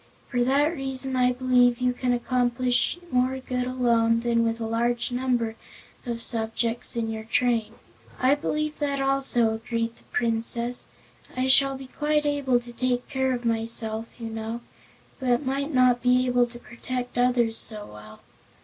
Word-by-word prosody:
For 245 0 +1
that 285 +6 +2
reason 265 -1 -3
I 250 0 +3
believe 250 -1 +3
you 250 0 +1
can 250 0 -1
accomplish 245 +3 +1
more 255 +1 +1
good 250 -1 -3
alone 230 -2 +2
than 235 -1 +2
with 230 0 -1
a 225 - -3
large 240 +2 0
number 245 -3 0 0.5
of 235 -1 -3
subjects 230 +1 -2
in 225 -1 -1
your 220 0 -5
train." 225 -1 0 0.4
"I 260 +2 +4
believe 305 +1 -2
that 285 -2 -1
also," 270 -4 +2
agreed 230 +1 -3
the - - -22
Princess. 235 +1 -1 0.5
"I 255 - +1
shall 270 +1 +5
be 265 - -9
quite 300 +3 0
able 280 -4 +2
to 240 0 -12
take 250 0 -1
care 265 -2 0
of 245 -1 -3
myself, 225 -1 -1
you 230 -1 -5
know, 225 +1 -5 0.6
but 255 +1 +1
might 275 +3 -1
not 255 -2 +4
be 250 +1 +3
able 245 -1 +3
to 240 0 -12
protect 245 +1 -6
others 240 -2 +2
so 210 -2 0
well. 105 0 -13
245 Hz, 160 wpm, -25 LUFS, 230-260 Hz, 0.6 s, shall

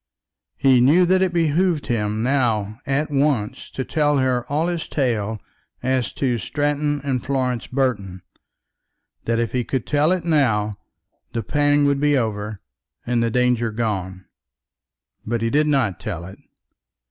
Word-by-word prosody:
He 130 -3 +4
knew 160 +8 +5
that 185 +1 +3
it 190 -2 +2
behoved 170 -1 +1
him 110 -2 -1
now 115 -5 0
at 145 +3 0
once 135 -7 0
to 130 - -4
tell 150 -2 +1
her 130 -1 0
all 155 +3 +1
his 175 -2 -2
tale 110 -6 -1 0.4
as 130 -1 0
to 125 -4 0
Stratton 145 +4 -1
and 130 -3 -1
Florence 130 -3 -1
Burton; 100 -9 -2 1.0
that 115 0 +1
if 115 -1 -1
he 125 -1 0
could 130 0 -3
tell 150 +3 +2
it 185 -3 -1
now, 110 -10 +2 0.6
the 115 - -2
pang 145 +3 +2
would 140 -1 +2
be 145 0 +3
over 105 -3 -2 0.5
and 120 -1 +1
the 115 - +1
danger 125 -1 +1
gone. 95 -5 -3 1.0
But 115 +1 -2
he 115 - 0
did 150 +1 +3
not 130 - +1
tell 85 0 -5
it. 95 +2 -11
130 Hz, 150 wpm, -22 LUFS, 110-145 Hz, 1.0 s, knew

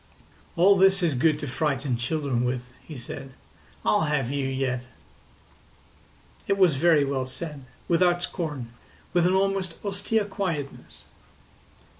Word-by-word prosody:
"All 190 +3 +5
this 190 0 +4
is 165 -4 +2
good 150 +4 +2
to 150 - -5
frighten 135 -1 -1
children 125 0 -1
with," 125 0 -3
he 155 - -9
said. 135 +2 -8 0.5
"I'll 105 +9 +3
have 145 -4 0
you 140 -1 -1
yet." 130 -2 -2 1.6
It 200 - +2
was 185 -5 +5
very 155 0 +4
well 135 -2 -2
said, 145 0 -7 0.2
without 175 0 +3
scorn, 150 -12 -4 0.4
with 175 -1 +4
an 185 - +2
almost 190 -3 0
austere 200 +2 0
quietness. 175 -8 -5
150 Hz, 130 wpm, -26 LUFS, 130-180 Hz, 1.6 s, All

